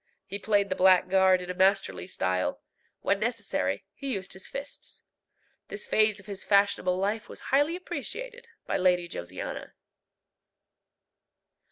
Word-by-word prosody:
He 200 +1 -5
played 205 -1 +2
the 185 - 0
blackguard 185 0 +5
in 180 - -4
a - - -4
masterly 190 0 +2
style: 90 - -1 0.4
when - - +1
necessary, 95 - -1
he 270 +3 -4
used 190 -3 -4
his 190 +1 -9
fists. 280 +1 -7 0.6
This - - -4
phase 215 -1 +3
of 200 - -14
his 200 -2 -6
fashionable 200 -3 +3
life 205 +3 -1
was - - -8
highly 290 +5 +4
appreciated 485 +6 -6 0.2
by - - 0
Lady 180 -1 +3
Josiana. 90 - -6
190 Hz, 135 wpm, -28 LUFS, 180-215 Hz, 0.6 s, blackguard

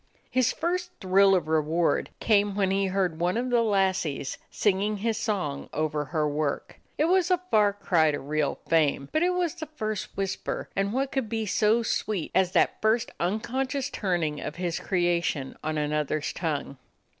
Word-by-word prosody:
His 255 -2 +3
first 355 +2 -2
thrill 195 +1 +5
of 180 - 0
reward 160 +2 +1
came 205 -2 +2
when 195 -2 +1
he 195 0 +1
heard 185 -4 0
one 180 +5 +1
of 250 +1 -1
the 240 -1 +4
lassies 190 -10 0
singing 205 +1 +1
his 225 +2 -1
song 195 - -2
over 150 0 -1
her 150 +2 0
work. 145 -1 -2 0.2
It 305 - +3
was 365 +1 +3
a 365 - +4
far 210 -2 +5
cry 175 -6 +2
to 145 - -1
real 150 +1 -1
fame, 145 -4 +2
but 310 - +1
it 360 +1 +2
was 350 -3 0
the 315 - -7
first 215 -9 -4
whisper, 195 -1 -3
and 195 +1 0
what 270 +3 -1
could 265 -5 -2
be 225 -1 -1
so 215 +3 +2
sweet 215 -5 -2
as 185 -1 +2
that - - +2
first 225 +2 +2
unconscious 255 +8 -1
turning 170 -7 -1
of 150 - -5
his 175 -1 -2
creation 175 -6 0
on 155 0 -2
another's 150 0 -1
tongue? 145 -5 -3
195 Hz, 175 wpm, -27 LUFS, 155-225 Hz, 0.2 s, thrill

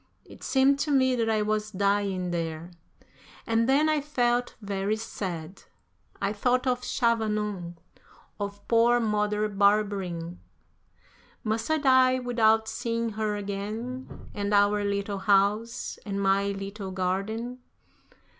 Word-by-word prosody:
It - - -14
seemed 275 +1 +3
to 300 - -1
me 260 -2 +3
that 230 -2 0
I 215 -1 +2
was 215 0 -1
dying 200 -2 0
there. 165 0 -4 0.7
And 230 +2 +1
then 290 +3 +4
I 310 -1 +2
felt 245 -4 0
very 200 0 -1
sad. 185 -5 -6 0.6
I 200 +1 -1
thought 250 +4 +1
of 250 -1 +1
Chavanon, 210 -7 -1 0.6
of 200 0 -6
poor 235 +1 +4
Mother 210 -1 0
Barberin. 200 -4 0 1.0
Must 225 +2 -2
I 315 - +3
die 260 -3 +4
without 225 -3 +2
seeing 230 +1 -2
her 215 -1 -2
again, 210 +6 -5
and 205 0 -1
our 205 0 +3
little 200 0 -2
house, 205 +4 +1
and 200 -2 -3
my 195 0 +2
little 195 0 -5
garden! 195 +7 -2
210 Hz, 125 wpm, -27 LUFS, 200-235 Hz, 1.0 s, then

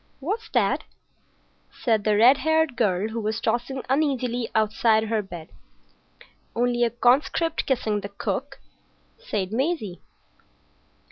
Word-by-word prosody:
"What's 410 +11 -4
that?" - - +1 0.9
said 220 -4 0
the 210 -1 +3
red 250 +5 +7
haired 315 -2 +1
girl, 210 -2 +1
who 225 +1 -4
was 215 +1 -2
tossing 260 +2 -2
uneasily 255 -4 0
outside 220 0 +3
her 220 0 0
bed. 175 -5 -10 1.1
"Only 240 0 +1
a 235 - +3
conscript 275 +7 +1
kissing 225 -6 0
the 200 - -6
cook," 235 +8 -4 0.6
said 205 - -3
Maisie. 255 - -2
240 Hz, 120 wpm, -24 LUFS, 215-270 Hz, 1.1 s, red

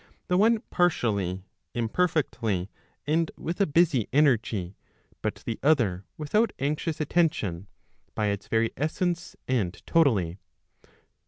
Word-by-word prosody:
the 180 - +3
one 220 +3 +4
partially, 100 - +1 0.3
imperfectly, 115 - 0 0.3
and 160 +2 +1
with 175 +5 -3
a 200 - +4
busy 150 - +3
energy, 110 -10 +2 0.5
but - - -1
the 115 - -3
other 115 - +2
without 210 +10 +1
anxious 150 +3 -2
attention, 140 - 0 0.5
by 110 - 0
its 100 -2 -2
very 115 0 +1
essence, 175 +4 -2
and 110 -7 -1
totally 105 - +2
130 Hz, 110 wpm, -27 LUFS, 105-165 Hz, 0.5 s, one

